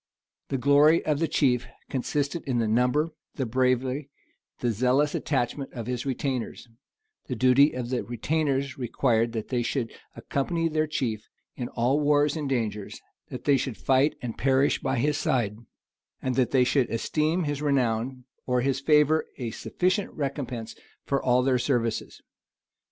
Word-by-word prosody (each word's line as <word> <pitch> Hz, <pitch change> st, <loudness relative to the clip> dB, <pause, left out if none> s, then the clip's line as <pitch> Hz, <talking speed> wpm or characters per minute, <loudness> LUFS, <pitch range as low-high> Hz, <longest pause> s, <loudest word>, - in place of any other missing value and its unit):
The 135 Hz, -, 0 dB
glory 145 Hz, +5 st, +5 dB
of 150 Hz, -2 st, +1 dB
the 165 Hz, -, +1 dB
chief 125 Hz, -5 st, +1 dB, 0.2 s
consisted 140 Hz, +4 st, -1 dB
in 130 Hz, -4 st, 0 dB
the 115 Hz, -2 st, +1 dB
number, 125 Hz, +8 st, +2 dB, 0.3 s
the 135 Hz, -, -1 dB
bravery, 130 Hz, +3 st, 0 dB, 0.5 s
and 120 Hz, -, 0 dB
the -, -, +2 dB
zealous 130 Hz, +6 st, +2 dB
attachment 135 Hz, 0 st, -2 dB
of 115 Hz, -3 st, -5 dB
his 125 Hz, +2 st, -3 dB
retainers; 130 Hz, -2 st, -3 dB, 0.6 s
the 125 Hz, -, -3 dB
duty 130 Hz, +4 st, +5 dB
of 125 Hz, -1 st, -4 dB
the 125 Hz, -, 0 dB
retainers 140 Hz, +3 st, -1 dB
required 120 Hz, -2 st, +1 dB
that 110 Hz, -2 st, -4 dB
they 125 Hz, -2 st, 0 dB
should 120 Hz, -1 st, -2 dB, 0.2 s
accompany 165 Hz, +4 st, -1 dB
their 155 Hz, -1 st, 0 dB
chief 115 Hz, -8 st, -3 dB, 0.3 s
in 125 Hz, -, -4 dB
all 125 Hz, +5 st, +1 dB
wars 145 Hz, 0 st, +3 dB
and 150 Hz, -3 st, -3 dB
dangers, 110 Hz, -6 st, -2 dB, 0.3 s
that -, -, -7 dB
they 140 Hz, -2 st, +4 dB
should 130 Hz, -4 st, -3 dB
fight 135 Hz, +3 st, +2 dB
and 115 Hz, -2 st, -5 dB
perish 135 Hz, +1 st, +2 dB
by 130 Hz, -1 st, -1 dB
his 145 Hz, +4 st, +1 dB
side, 110 Hz, -5 st, 0 dB, 0.6 s
and 130 Hz, -, -2 dB
that 125 Hz, -1 st, +2 dB
they 130 Hz, -2 st, +4 dB
should 125 Hz, 0 st, +2 dB
esteem 155 Hz, +9 st, 0 dB
his 145 Hz, -2 st, -2 dB
renown 130 Hz, -3 st, 0 dB, 0.2 s
or 125 Hz, -1 st, +2 dB
his 135 Hz, 0 st, 0 dB
favor 150 Hz, +2 st, +3 dB
a 120 Hz, -4 st, -4 dB
sufficient 185 Hz, -, -1 dB
recompense 130 Hz, -5 st, -4 dB, 0.3 s
for 140 Hz, -1 st, 0 dB
all 125 Hz, 0 st, +3 dB
their 130 Hz, -1 st, +2 dB
services. 120 Hz, -3 st, -1 dB
130 Hz, 160 wpm, -26 LUFS, 120-145 Hz, 0.6 s, glory